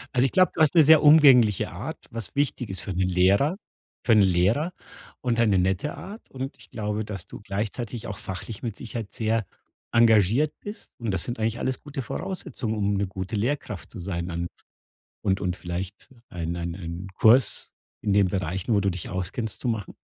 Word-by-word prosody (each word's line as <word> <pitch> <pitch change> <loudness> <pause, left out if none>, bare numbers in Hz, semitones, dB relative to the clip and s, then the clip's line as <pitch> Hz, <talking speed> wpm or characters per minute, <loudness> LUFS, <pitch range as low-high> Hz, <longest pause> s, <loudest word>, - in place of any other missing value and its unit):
Also, 125 +1 +4
ich 135 - 0
glaube, 185 -1 +4
du - - -2
hast 155 +1 +5
'ne 165 - +8
sehr 155 +1 +7
umgängliche 135 - +6
Art, - - -6
was 115 0 -7
wichtig 140 -4 0
ist 95 - -4
für 100 - -5
'n 90 - -3
Lehrer 95 - +3 0.5
für - - +3
'n 110 -2 +7
Lehrer 100 - +2 0.5
und 120 -2 0
eine 105 -4 +4
nette 95 - 0
Art. 205 +4 -10
Und 135 +1 -5
ich - - -17
glaube, 105 0 -2
dass 100 -4 -7
du - - -10
gleichzeitig 105 +3 -4
auch 105 - -5
fachlich 95 +3 -6
mit 115 -4 -4
Sicherheit 110 -1 -6
sehr 110 -1 0 0.5
engagiert 115 +4 +4
bist. 205 +2 -9
Und 115 - -3
das 95 -2 -1
sind 120 -1 -5
eigentlich 110 +1 0
alles 130 +1 -2
gute 145 -2 -5
Voraussetzungen, 125 - -4
um 100 -1 0
'ne 100 0 0
gute 95 +2 -5
Lehrkraft 110 -3 -2
zu 115 - -11
sein 85 -1 -3
dann 85 0 -3 0.8
und 95 0 +1
und 90 -2 -1
vielleicht 90 +7 -6 0.2
ein 85 -1 -4
ein 85 -1 -4
ein 85 0 -6
Kurs 115 +3 +4 0.3
in 105 - +1
den 100 -1 +4
Bereichen, 95 +3 -2
wo 100 - +4
du 100 - +1
dich 90 -1 -5
auskennst, 95 +5 -4
zu - - -6
machen. 110 -4 -2
105 Hz, 195 wpm, -25 LUFS, 95-125 Hz, 0.8 s, ne